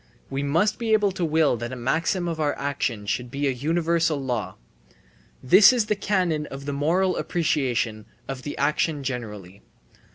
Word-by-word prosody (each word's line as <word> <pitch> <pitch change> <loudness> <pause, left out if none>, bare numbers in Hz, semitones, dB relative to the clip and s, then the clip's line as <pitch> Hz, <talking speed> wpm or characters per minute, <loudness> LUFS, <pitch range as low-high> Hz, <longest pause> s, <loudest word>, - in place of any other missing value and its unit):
We 135 +1 -2
must 165 +9 +1
be 225 -2 0
able 210 -2 +3
to 185 -1 -4
will 155 -5 +2
that 120 +2 -5
a - - -5
maxim 165 +8 0
of 165 -2 -3
our 150 -2 0
action 130 -6 -2
should 120 +4 -2
be 140 +3 -2
a - - +2
universal 165 +3 0
law. 125 -5 -3 0.9
This 190 - +8
is 240 -4 +1
the 210 - 0
canon 180 -7 0
of 135 0 -8
the 145 - -3
moral 175 +6 +1
appreciation 125 -10 -1 0.2
of 135 -1 -5
the 145 - -6
action 145 +1 0
generally. 105 -7 -6
145 Hz, 170 wpm, -24 LUFS, 130-170 Hz, 0.9 s, This